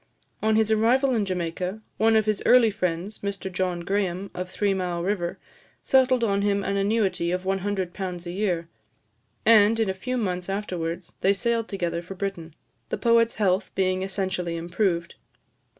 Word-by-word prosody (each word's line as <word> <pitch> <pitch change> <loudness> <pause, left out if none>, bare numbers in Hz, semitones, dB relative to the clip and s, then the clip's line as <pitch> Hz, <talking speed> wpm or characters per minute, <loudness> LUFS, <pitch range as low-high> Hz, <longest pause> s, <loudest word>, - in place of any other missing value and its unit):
On 220 0 +2
his 220 0 +2
arrival 250 +5 +3
in 220 -4 +1
Jamaica, 180 +2 -3 0.2
one 225 +1 +4
of 220 -1 +3
his 215 -2 0
early 240 -3 +6
friends, 185 0 -3
Mr 200 -1 -4
John 180 -1 -1
Graham, 195 0 -2
of 180 0 -5
Three 195 +2 0
Mile 180 -2 -2
River, 180 -3 -1 0.5
settled 260 -2 +3
on 200 -3 +1
him 200 0 +1
an 200 - -1
annuity 200 -3 +1
of 180 +1 -1
£100 190 -2 -3
a 175 - -4
year; 180 -3 -1 0.8
and, 220 0 +6
in 215 -4 +2
a - - -4
few 250 +7 -3
months 180 -5 -2
afterwards, 180 -4 -4
they 195 - +4
sailed 230 +2 0
together 175 -3 -2
for 180 +3 -9
Britain, 180 -5 -5 0.3
the - - -2
poet's 230 -1 +3
health 190 -2 +1
being 185 -1 +1
essentially 190 -3 -2
improved. 170 0 -1
195 Hz, 165 wpm, -25 LUFS, 180-215 Hz, 0.8 s, early